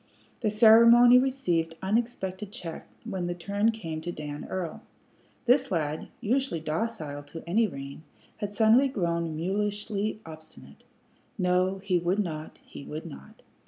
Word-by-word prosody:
The 220 - 0
ceremony 235 +3 +7
received 175 -12 0
unexpected 205 -2 -2
check 175 -8 -7 0.2
when 190 -6 -3
the 175 - -3
turn 200 +5 0
came 165 -9 -4
to 175 +2 -4
Dan 150 -2 -6
Earl. 180 -4 -4 0.6
This 260 +2 +4
lad, 155 -4 -2
usually 250 -4 0
docile 155 -3 -3
to 145 +3 -10
any 220 +6 +3
rein, 140 -3 -8 0.4
had 205 -1 -4
suddenly 225 +6 +5
grown 170 - -2
mulishly 205 +3 -2
obstinate. 160 0 -13 0.5
No, 185 0 +1
he 185 -3 +1
would 175 +3 0
not, 160 -6 -4
he - - -10
would 155 +3 -7
not. 70 0 -12
190 Hz, 135 wpm, -27 LUFS, 165-220 Hz, 0.6 s, ceremony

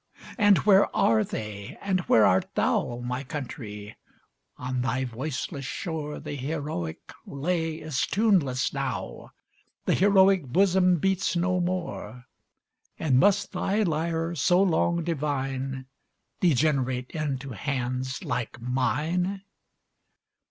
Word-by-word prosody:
And 205 -3 +6
where 200 -1 +5
are 110 -1 +4
they? 105 -2 -6
and 190 -2 0
where 110 - +6
art 95 - +2
thou, 120 0 0
My 125 +2 -3
country? 115 -7 -7 0.6
On 125 0 -3
thy 130 +1 -1
voiceless 135 +4 -4
shore 150 -1 -4
The - - -6
heroic 140 - -3 0.3
lay 160 +3 -1
is 155 -4 -2
tuneless 185 - +2
now - - -4 0.6
The - - +2
heroic 190 -4 +4
bosom 185 +4 +3
beats 190 +2 0
no 180 +1 +1
more! 175 -8 -4 0.7
And 135 -5 +2
must 205 +8 +3
thy 210 +3 0
lyre, 165 0 -1
so 175 +3 +3
long 170 -1 +1
divine, 135 -4 -2 0.5
Degenerate 130 -6 +1
into 140 -4 -3
hands 130 - -3
like 125 -2 -3
mine? 155 +10 -1
145 Hz, 110 wpm, -26 LUFS, 125-175 Hz, 0.7 s, And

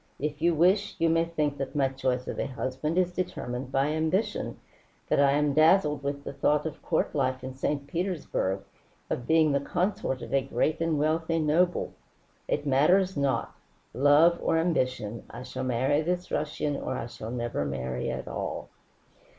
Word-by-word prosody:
If 150 +1 -3
you 170 0 +3
wish, 190 +6 +3
you 165 - +2
may 165 0 +3
think 150 -4 -2
that 135 - -4
my 140 -2 +3
choice 130 -1 -2
of - - -4
a - - -1
husband 130 +5 -3
is 180 -1 +2
determined 130 -8 -4
by 135 +1 +2
ambition, 160 +7 -1 0.5
that - - +3
I 140 -1 +5
am 145 0 +2
dazzled 155 -1 +4
with 140 0 -3
the - - -6
thought 150 +2 +1
of 160 - -5
court 160 - 0
life 130 -2 0
in 130 0 -5
St. 140 +2 -2
Petersburg, 150 - -2 0.5
of 120 - -2
being 160 -1 +4
the 140 - +2
consort 175 - -1
of - - -7
a 135 - +4
great 150 +4 -1
and 165 -2 +1
wealthy 160 +2 +1
noble. 165 +3 +1 0.5
It - - -1
matters 180 +8 +3
not. 135 -5 0 0.4
Love 145 +6 +5
or 165 - +2
ambition, 130 -9 0
I 120 +2 -8
shall - - -5
marry 130 +4 +1
this 180 +2 -2
Russian 150 -1 -1
or 130 - -3
I - - -4
shall 115 -2 -8
never 120 -9 -2
marry 65 -3 -3
at - - -4
all." - - -4
145 Hz, 175 wpm, -28 LUFS, 130-165 Hz, 0.5 s, I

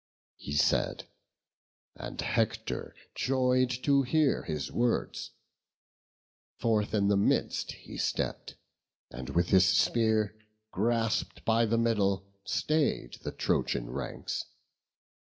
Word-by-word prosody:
He 70 - -7
said, 75 - +1 0.9
and - - -8
Hector - - -1 0.2
joy'd 130 -1 +2
to 140 -1 +4
hear 145 +2 +2
his 75 -5 -4
words: 120 0 -1 1.3
Forth 110 -2 +1
in 100 -1 +2
the 100 - +3
midst 100 - +1
he - - -11
stepp'd, - - -2 0.6
and 65 +2 -7
with 85 +4 +1
his 95 -1 +6
spear 110 +2 +2 0.4
Grasp'd 115 +2 0
by 115 0 +3
the 115 +2 +1
middle, 100 -4 +1 0.2
stay'd 150 - 0
the - - -4
Trojan - - -1
ranks. 70 +2 -4
110 Hz, 105 wpm, -30 LUFS, 95-120 Hz, 1.3 s, his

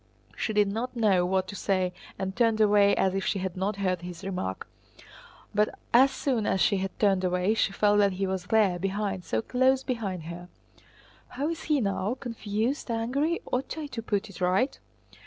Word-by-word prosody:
She - - -2
did 210 -1 +3
not 230 +5 -3
know 195 -6 +3
what 190 0 0
to 200 - -6
say 185 -2 0 0.2
and 190 0 -3
turned 230 -2 +2
away 205 -1 +5
as 190 -1 +1
if 195 0 -1
she 200 - 0
had 185 -2 -3
not 195 +3 -1
heard 185 -3 -1
his 175 +1 -8
remark. 180 - -4 0.9
But 210 +1 +1 0.2
as 260 +3 +7
soon 260 -5 -1
as 190 - +1
she 195 +3 +3
had 190 0 -4
turned 195 -3 +3
away 180 +3 +1
she 220 - +1
felt 205 +1 +3
that 200 -2 +3
he 195 +1 -1
was 190 -1 -3
there, 200 -5 +3
behind, 195 0 -2
so 110 0 -1
close 260 +1 +2
behind 200 - -3
her. 170 +2 -8 0.8
"How 280 +5 -3
is 330 - -5
he 300 -2 +2
now? 200 +2 -1
Confused? 230 +3 -2
Angry? 265 +9 0
Ought 255 +5 -2
I 310 - -4
to 260 -5 -6
put 210 -1 -1
it 190 -4 -12
right?" 185 +9 +1
200 Hz, 195 wpm, -27 LUFS, 185-230 Hz, 0.9 s, as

